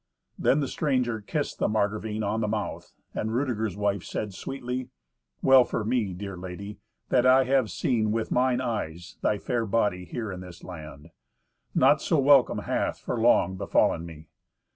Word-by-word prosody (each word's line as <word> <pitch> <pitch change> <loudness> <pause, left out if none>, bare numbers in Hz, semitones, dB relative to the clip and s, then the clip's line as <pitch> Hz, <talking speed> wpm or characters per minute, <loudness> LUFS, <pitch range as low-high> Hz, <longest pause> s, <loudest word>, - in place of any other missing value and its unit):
Then 150 - +3
the 140 - -1
stranger 125 -6 0
kissed 145 +8 -3
the - - +2
Margravine 110 0 -1
on 105 +2 -1
the 105 - 0
mouth, 105 -1 -4 0.2
and 110 - -2
Rudeger's 110 -7 -1
wife 100 -1 0
said 105 -2 -4
sweetly, 125 +2 -5 0.5
"Well 130 -1 +7
for 115 - -3
me, 115 -4 0
dear 100 +1 -6
lady, 95 +3 -8 0.3
that 125 - +3
I 130 +1 +6
have 130 -3 +2
seen 110 -4 0
with 115 0 -2
mine 125 0 +2
eyes 90 -8 -4
thy 105 - +1
fair 120 +2 -1
body 100 -4 0
here 110 +4 -5
in 90 - -6
this 90 -2 -11
land! 80 -3 -10 0.6
Naught - - +5
so 160 - +1
welcome 140 -2 +5
hath, - - -1
for 120 - -4
long, 95 -5 +3
befallen 95 -3 +2
me." 80 -2 -10
110 Hz, 165 wpm, -27 LUFS, 95-125 Hz, 0.6 s, Well